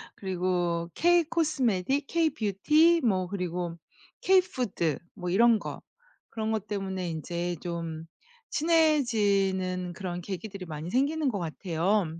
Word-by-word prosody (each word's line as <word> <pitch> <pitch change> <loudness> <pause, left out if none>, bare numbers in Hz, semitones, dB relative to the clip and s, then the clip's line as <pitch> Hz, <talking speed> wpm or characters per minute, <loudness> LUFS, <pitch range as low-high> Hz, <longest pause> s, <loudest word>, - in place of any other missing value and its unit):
그리고 175 -3 -1
케이 345 - +4
코스메틱, 275 - 0
케이 335 -2 +2
뷰티, 300 - +3
뭐 190 -6 +1
그리고 180 -3 -3 0.5
케이 380 0 +6
푸드 235 - -2 0.2
뭐 180 -3 -4
이런 230 +5 +5
거. - - -7 0.5
그런 220 -1 -3
것 215 -2 -2
때문에 190 -3 -3
인제 170 +2 -3
좀 165 -2 -5 0.5
친해지는 205 - +2
그런 175 0 -5
계기들이 195 +1 -6
많이 155 0 -6
생기는 285 +4 +1
것 205 -5 -2
같아요. 175 +4 0
195 Hz, 260 characters per minute, -28 LUFS, 175-260 Hz, 0.5 s, 케이